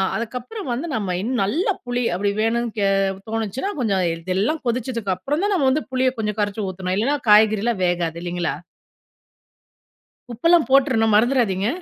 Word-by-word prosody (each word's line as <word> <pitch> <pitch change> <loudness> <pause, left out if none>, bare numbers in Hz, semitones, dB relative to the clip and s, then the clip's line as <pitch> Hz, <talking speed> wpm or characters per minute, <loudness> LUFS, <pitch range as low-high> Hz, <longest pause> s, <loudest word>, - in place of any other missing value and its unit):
அதுக்கப்பறம் 250 - -5
வந்து 270 +8 -3
நம்ம 205 -4 -2
இன்னும் 240 +1 -1
நல்ல 290 - 0 0.2
புளி 245 0 -1
அப்டி 200 +2 0
வேணும் 235 +2 +1
கே 200 -1 +2 0.4
தோணுச்சுனா 225 - -3
கொஞ்சம் 200 -6 +1
இதெல்லாம் 190 - -1
கொதிச்சதுக்கு 235 -4 -1
அப்பறம் 290 - -2
தான் 410 - +1
நம்ம 285 -7 +2
வந்து 305 +3 0
புளிய 260 0 +2
கொஞ்சம் 210 -1 -2
கரைச்சி 205 +1 -1
ஊத்தணும். 185 0 -3
இல்லன்னா 255 +8 +1
காய்கறிலா 215 +2 +5
வேகாது. 170 -2 -1
இல்லங்களா? 175 0 -2 1.8
உப்பெல்லாம் 330 +3 +3
போட்றணும் 255 -6 +3
மறந்துறாதீங்க! 220 -4 +2
225 Hz, 140 wpm, -21 LUFS, 200-260 Hz, 1.8 s, காய்கறிலா